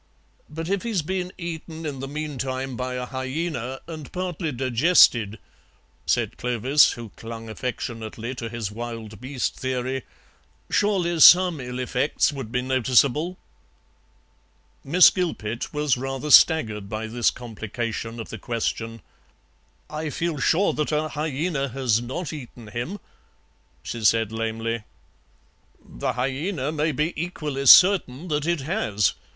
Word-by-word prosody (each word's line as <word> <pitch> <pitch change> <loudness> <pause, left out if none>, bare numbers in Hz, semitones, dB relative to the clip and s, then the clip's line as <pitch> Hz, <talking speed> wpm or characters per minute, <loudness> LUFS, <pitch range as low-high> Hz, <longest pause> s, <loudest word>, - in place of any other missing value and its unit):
"But 160 +2 -5
if 195 +1 0
he's 220 -8 -1
been 180 +2 -3
eaten 165 -1 -6
in 140 -3 -4
the 135 - -5
meantime 135 -3 -4
by 125 +1 -3
a 125 0 -3
hyaena 130 0 -4
and 155 -3 -8
partly 180 -3 -3
digested," 120 - +4 0.7
said - - 0
Clovis, 125 +4 +3
who 120 -3 -8
clung 115 +2 -9
affectionately 115 -1 -5
to 115 -3 -5
his 115 -3 -4
wild 115 -1 -7
beast 130 0 -2
theory, 130 0 -2 0.7
"surely 180 -5 +1
some 175 0 +8
ill 125 -1 -6
effects 130 +4 0
would 135 -6 -6
be 125 +1 0
noticeable?" 130 +6 +2 1.5
Miss 175 +6 +7
Gilpet 120 - -3
was 150 -3 +1
rather 135 +3 -3
staggered 110 - +5
by 110 +1 -3
this 115 +1 +1
complication 115 0 -5
of 115 - -7
the - - -7
question. 115 -1 -3 0.8
"I 155 0 -4
feel 165 0 -2
sure 175 +9 +2
that 150 0 -1
a 155 +1 0
hyaena 150 -2 -2
has 125 -4 +1
not 150 +8 -5
eaten 120 -6 -9
him," 120 - -4 0.8
she 115 -2 -5
said 110 0 +3
lamely. 115 +1 -2 1.0
"The - - -4
hyaena 135 +4 -2
may 155 0 0
be 150 +4 -1
equally 150 -5 -3
certain 180 -3 +6
that 150 0 -1
it 170 -4 +1
has. 135 - 0
130 Hz, 130 wpm, -24 LUFS, 120-160 Hz, 1.5 s, some